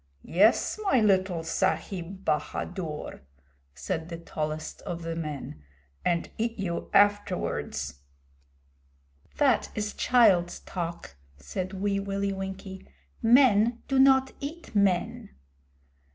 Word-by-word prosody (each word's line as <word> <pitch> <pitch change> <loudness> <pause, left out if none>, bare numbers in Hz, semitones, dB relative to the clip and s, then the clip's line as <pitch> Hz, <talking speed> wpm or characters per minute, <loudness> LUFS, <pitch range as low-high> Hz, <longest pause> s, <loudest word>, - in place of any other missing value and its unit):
'Yes, 205 - +3
my 385 -11 +3
little 190 -5 +2
Sahib 190 +1 -2
Bahadur,' 155 +1 -3 0.5
said 160 - -4
the 170 - -5
tallest 155 -2 -5
of 170 -1 -5
the 165 0 -3
men, 150 - -6 0.4
'and 170 -1 +1
eat 230 +1 -1
you 180 -4 -3
afterwards.' 205 - +1 1.4
'That 270 -6 +3
is 210 -1 -2
child's 195 -9 +3
talk,' 170 - -6 0.2
said 180 - -5
Wee 200 +1 0
Willie 200 0 -2
Winkie. 190 0 -7 0.3
'Men 235 -1 +5
do 270 -1 +2
not 265 0 +5
eat 310 +2 -7
men.' 195 -4 +1
190 Hz, 105 wpm, -27 LUFS, 170-215 Hz, 1.4 s, Men